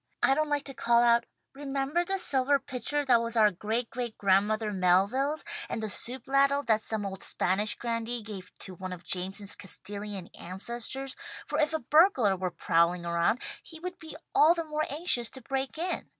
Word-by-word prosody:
"I 270 - +5
don't 305 +2 0
like 290 -1 +1
to 275 - -6
call 235 -1 +3
out 235 0 +4 0.3
'remember 275 +4 -1
the 390 +2 -1
silver 280 -5 +2
pitcher 280 +2 -2
that 240 -3 +5
was 230 0 -2
our 215 -1 +6
great 220 +6 -2
great 240 -2 -4
grandmother 210 +2 +2
Melville's, 200 +11 +2 0.2
and - - -2
the 215 -2 -3
soup 250 +5 -4
ladle 275 +1 +3
that 220 -4 +2
some 215 -2 -2
old 190 -1 -6
Spanish 205 +4 +1
grandee 230 0 -2
gave 200 -4 -8
to 190 - -3
one 185 +1 -6
of 180 -1 -10
Jameson's 195 +2 -1
Castilian 200 -1 -5
ancestors,' 240 +8 -3 0.3
for - - -2
if 305 0 +2
a 315 - -1
burglar 290 - +4
were 185 0 -2
prowling 170 0 +1
around 170 +8 +1 0.2
he 320 - -9
would 360 +1 -6
be 315 -2 -9 0.2
all 320 +3 +6
the 335 - -2
more 305 0 -1
anxious 280 -6 +1
to 260 - -10
break 270 +3 -3
in. 355 +3 -1
235 Hz, 185 wpm, -29 LUFS, 200-280 Hz, 0.3 s, our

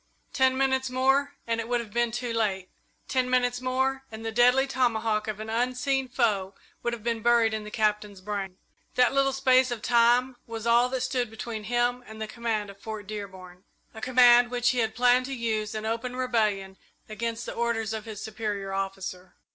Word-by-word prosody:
Ten 260 -1 +3
minutes 265 -1 +1
more 270 +2 +2
and 230 0 -1
it 225 - -7
would 245 0 +1
have 220 -3 -8
been 240 0 +2
too 240 0 -3
late. 195 -5 -1 0.4
Ten 255 -2 0
minutes 245 -1 +1
more 265 +1 0
and 220 0 -8
the 225 - -2
deadly 250 +3 +4
tomahawk 225 -5 0
of 215 -1 -4
an 215 - -6
unseen 255 +3 0
foe 205 -6 0 0.3
would 240 - -1
have 230 -3 -7
been 230 -1 -1
buried 235 -1 +3
in 215 -1 -3
the - - -7
Captain's 210 -2 -1
brain. 195 -1 -5 0.4
That 250 0 +4
little 275 0 +3
space 260 -1 +3
of 240 -3 -5
time 245 +2 +3
was 225 -1 -6
all 235 +1 +4
that 260 0 -2
stood 255 -2 -1
between 220 -1 -6
him 245 +2 0
and 220 0 -10
the 220 - -2
command 215 -2 -3
of 200 - -18
Fort 215 -2 -6
Dearborn 190 -3 -8 0.3
a 220 - -10
command 245 -1 +6
which 245 0 +1
he 250 - -1
had 225 -1 0
planned 250 +1 +3
to 270 - -4
use 220 -3 -2
in 215 0 -4
open 230 +3 -3
rebellion 215 -6 0 0.3
against 230 +2 -4
the - - -5
orders 225 -2 -1
of 220 0 -5
his 215 -2 -7
superior 210 -3 -4
officer. 195 -1 -5
235 Hz, 195 wpm, -27 LUFS, 215-250 Hz, 0.4 s, command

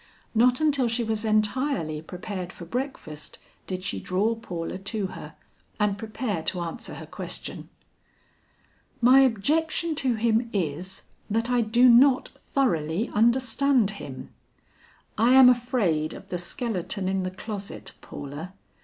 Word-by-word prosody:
Not 245 +2 +4
until 285 -5 +2
she 235 +1 -1
was 220 -1 -2
entirely 215 - 0
prepared 180 +2 -6
for 175 - -10
breakfast 235 - -5 0.3
did 185 -1 -4
she 100 - -2
draw 195 - 0
Paula 185 -6 -5
to 200 +1 -3
her, - - -9 0.4
and 210 -1 +2
prepare 215 -3 -3
to 175 +2 -2
answer 165 -1 -6
her - - -8
question. - - -6 1.3
"My 255 +2 +7
objection 310 +7 +2
to 255 -4 +2
him 230 +1 +1
is, 180 0 -3 0.3
that 225 +3 0
I 245 -1 +3
do 235 +3 +4
not 255 +2 +6
thoroughly 175 - -1
understand 240 +1 +3
him. 130 -2 -8 0.9
I 240 +4 +5
am 260 -1 +9
afraid 230 -11 +1
of - - -12
the 180 - -2
skeleton 185 0 -3
in 190 0 0
the 185 - -2
closet, 200 +1 -7
Paula. 145 +6 -8
215 Hz, 135 wpm, -26 LUFS, 185-250 Hz, 1.3 s, am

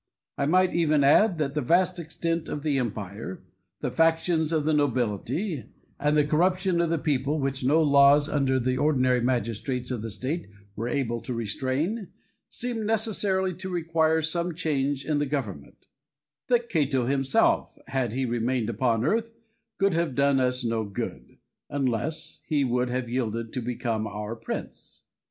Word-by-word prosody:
I 140 - 0
might 185 +3 +3
even 155 -4 +3
add, 175 +7 +5
that 145 -3 -1
the 150 - 0
vast 180 +6 +2
extent 165 0 -3
of 145 - -4
the 145 -3 +1
empire, 105 -4 -5 0.4
the - - -2
factions 165 +2 +2
of 155 -3 +1
the 155 - +2
nobility, 130 - 0 0.3
and 150 +1 +2
the 150 - +4
corruption 180 +3 +2
of 170 - +1
the 165 - +1
people, 145 -1 0
which 135 -2 -2
no 155 +5 +4
laws 140 0 +6
under 135 -3 +1
the 130 +1 0
ordinary 130 -4 +2
magistrates 120 +1 -1
of 120 -4 -2
the 115 - -4
state 135 - -4 0.3
were 115 +3 -3
able 120 -3 -1
to 125 - -5
restrain, 135 - -2 0.4
seemed 240 -2 -4
necessarily 200 -4 0
to 190 +2 -7
require 160 -2 +1
some 170 +1 -1
change 140 -4 -1
in 150 0 +1
the 145 - 0
government; 110 - -5 0.6
that 240 -1 +2
Cato 140 - +1
himself, 135 +1 +2
had 130 -5 -1
he 130 +1 0
remained 120 -1 0
upon 115 0 +1
earth, 230 +7 +1 0.5
could 195 -1 +2
have 165 -5 0
done 140 0 +3
us 125 0 +1
no 115 -1 0
good, 100 -2 -6 0.3
unless 145 +3 -2
he 145 -2 +2
would 125 0 0
have 125 0 -2
yielded 115 -2 -2
to 125 - -2
become 115 -2 -2
our 105 +2 -5
prince. 115 - -7
140 Hz, 160 wpm, -26 LUFS, 125-165 Hz, 0.6 s, laws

